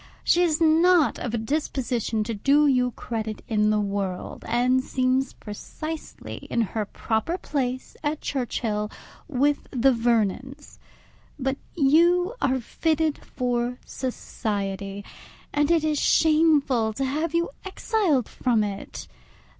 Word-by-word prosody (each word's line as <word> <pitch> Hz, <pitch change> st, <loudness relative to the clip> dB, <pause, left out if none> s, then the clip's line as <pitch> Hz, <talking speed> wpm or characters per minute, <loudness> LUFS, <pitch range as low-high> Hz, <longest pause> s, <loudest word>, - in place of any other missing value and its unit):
She 350 Hz, -, +4 dB
is 325 Hz, -4 st, +2 dB
not 330 Hz, 0 st, +4 dB
of 240 Hz, -1 st, -3 dB
a -, -, 0 dB
disposition 240 Hz, -3 st, -1 dB
to 230 Hz, +2 st, -3 dB
do 280 Hz, +8 st, +3 dB
you 250 Hz, -3 st, +3 dB
credit 220 Hz, -2 st, -5 dB
in 210 Hz, -2 st, +2 dB
the 215 Hz, 0 st, +2 dB
world, 200 Hz, -3 st, -3 dB
and 250 Hz, +2 st, +2 dB
seems 260 Hz, 0 st, 0 dB
precisely 310 Hz, +9 st, -7 dB
in 235 Hz, -, +1 dB
her 220 Hz, 0 st, -2 dB
proper 225 Hz, -, -2 dB
place 260 Hz, -7 st, -3 dB
at 300 Hz, 0 st, -1 dB
Churchhill, 225 Hz, -5 st, -2 dB, 0.4 s
with 290 Hz, 0 st, +1 dB
the 265 Hz, +1 st, +3 dB
Vernons. 240 Hz, +4 st, -1 dB, 0.6 s
But 270 Hz, -1 st, -1 dB, 0.2 s
you 345 Hz, -, +4 dB
are 260 Hz, -1 st, +2 dB
fitted 315 Hz, +5 st, 0 dB
for 245 Hz, -1 st, -2 dB
society, 200 Hz, -5 st, -4 dB, 0.5 s
and 290 Hz, 0 st, +2 dB
it 335 Hz, -2 st, +3 dB
is 305 Hz, -2 st, +1 dB
shameful 300 Hz, -8 st, +3 dB
to 270 Hz, +5 st, -2 dB
have 305 Hz, +5 st, -1 dB
you 340 Hz, -2 st, +1 dB
exiled 380 Hz, -, 0 dB
from 235 Hz, -4 st, +1 dB
it. 200 Hz, -1 st, -6 dB
260 Hz, 125 wpm, -25 LUFS, 225-305 Hz, 0.6 s, She